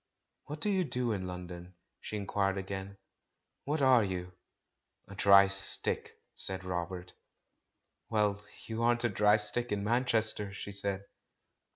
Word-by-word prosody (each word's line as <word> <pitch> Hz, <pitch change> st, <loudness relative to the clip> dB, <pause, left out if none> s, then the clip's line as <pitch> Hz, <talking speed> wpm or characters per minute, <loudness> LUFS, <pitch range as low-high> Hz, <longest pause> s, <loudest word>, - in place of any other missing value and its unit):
"What 150 Hz, +1 st, -7 dB
do 210 Hz, -, +1 dB
you 190 Hz, -2 st, +2 dB
do 125 Hz, -5 st, -2 dB
in 95 Hz, -3 st, -3 dB
London?" 90 Hz, 0 st, -8 dB, 0.2 s
she -, -, -7 dB
inquired 100 Hz, -1 st, -1 dB
again. 95 Hz, +1 st, -6 dB, 0.7 s
"What 145 Hz, 0 st, -1 dB
are 130 Hz, -4 st, +6 dB
you?" 90 Hz, -2 st, -4 dB, 0.7 s
"A 100 Hz, -, -11 dB
dry 100 Hz, 0 st, +6 dB
stick," 100 Hz, 0 st, 0 dB, 0.2 s
said 95 Hz, 0 st, 0 dB
Robert. 90 Hz, 0 st, -5 dB, 1.0 s
"Well, 105 Hz, -2 st, 0 dB, 0.2 s
you 115 Hz, 0 st, -4 dB
aren't 120 Hz, 0 st, +2 dB
a 120 Hz, -, +2 dB
dry 105 Hz, +1 st, +4 dB
stick 110 Hz, +3 st, -2 dB
in 100 Hz, -1 st, -1 dB
Manchester!'* 110 Hz, -3 st, +3 dB
she 100 Hz, -, -7 dB
said. 100 Hz, 0 st, -2 dB
100 Hz, 140 wpm, -31 LUFS, 95-115 Hz, 1.0 s, are